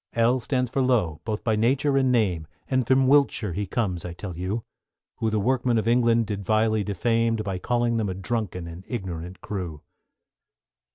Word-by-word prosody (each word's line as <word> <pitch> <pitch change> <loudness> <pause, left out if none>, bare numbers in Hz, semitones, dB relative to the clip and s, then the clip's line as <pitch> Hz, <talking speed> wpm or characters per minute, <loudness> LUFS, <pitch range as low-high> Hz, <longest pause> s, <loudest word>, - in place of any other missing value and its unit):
=L= 115 +2 +3
stands 125 -1 -1
for 135 - +1
Lowe, 110 - +1
both 110 -1 -3
by 110 -2 +2
nature 135 +6 +2
and 130 -1 +3
name, 95 -10 +1 0.2
And 130 -3 +1
from 130 0 +4
Wiltshire 130 -8 +3
he 100 +3 -2
comes 95 -7 -1
I 90 - -5
tell 90 0 -7
you; 95 +6 -3 0.5
Who 110 - 0
the 110 -1 0
workmen 125 +2 +1
of 110 - 0
England 115 -1 +3
did 100 -1 -4
vilely 110 +1 +2
defame, 115 +3 +1
By 100 -4 -3
calling 120 +1 +1
them 105 -3 0
a 95 - -3
drunken 95 -3 -3
and 85 +2 -9
ignorant 90 -5 -5
crew. 90 -7 -5
110 Hz, 180 wpm, -25 LUFS, 95-120 Hz, 0.5 s, from